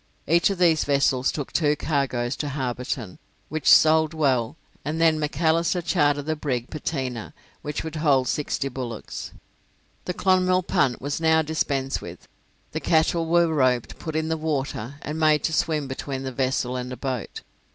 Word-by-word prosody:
Each 170 +5 +3
of 195 - -2
these 170 -3 +4
vessels 140 -2 +2
took 145 -3 -5
two 150 -3 +2
cargoes 135 -5 -1
to 150 - -3
Hobarton, 125 -5 -4 0.3
which 155 -1 0
sold 160 0 +6
well, 130 -5 +1 0.3
and 155 +2 -3
then 160 -1 +4
Macalister 165 +3 +1
chartered 145 -3 +1
the 155 0 -1
brig 130 -5 -3
'Pateena', 130 -7 -4 0.3
which 150 0 -4
would 160 0 -5
hold 140 -5 +3
sixty 140 +1 -1
bullocks. 125 -4 -6 0.7
The 180 - -3
'Clonmel' 185 -1 +3
punt 130 -7 +1
was 145 +3 -2
now 160 0 +4
dispensed 140 -3 -1
with; - - -10 0.4
the - - -3
cattle 165 +1 +2
were 170 +1 +4
roped, 130 -5 +1
put 160 -2 -5
in 160 0 0
the 160 - 0
water, 140 -5 -3
and 155 +2 -4
made 155 -1 +3
to 160 - 0
swim 155 -2 0
between 130 0 -5
the 130 - -4
vessel 130 -1 -1
and 125 0 -4
a 125 - -6
boat. 130 -3 -4
145 Hz, 165 wpm, -24 LUFS, 130-160 Hz, 0.7 s, sold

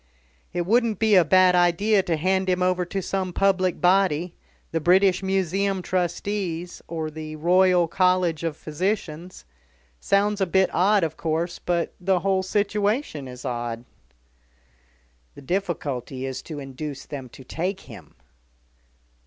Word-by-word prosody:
"It 175 -1 -2
wouldn't 230 +1 +2
be 220 +1 +2
a 185 -3 +7
bad 185 +3 +5
idea 180 +4 +3
to 170 -3 -1
hand 190 +3 +1
him 180 0 +1
over 180 0 +1
to 195 +2 -4
some 190 -1 -2
public 185 -1 +1
body 180 -2 +2 0.4
the 165 - 0
British 185 +3 +4
Museum 190 0 0
Trustees, 180 -1 -3
or 160 -2 -4
the 155 0 -7
Royal 180 +2 +3
College 180 -2 +1
of 160 -2 -2
Physicians. 180 +1 -4 0.5
Sounds 205 - +1
a 190 - +2
bit 190 +2 +2
odd, 195 +2 +3
of 160 -1 -2
course, 165 +2 -2
but 170 -1 -1
the 185 -1 +1
whole 190 0 +1
situation 205 - -1
is 125 0 -10
odd." 120 -1 -4 1.5
"The - - -12
difficulty 140 -7 -3
is 130 -1 -4
to 155 - -8
induce 135 0 -7
them 135 -4 -7
to 130 - -13
take 185 +8 -3
him." - - -13
180 Hz, 140 wpm, -24 LUFS, 160-190 Hz, 1.5 s, a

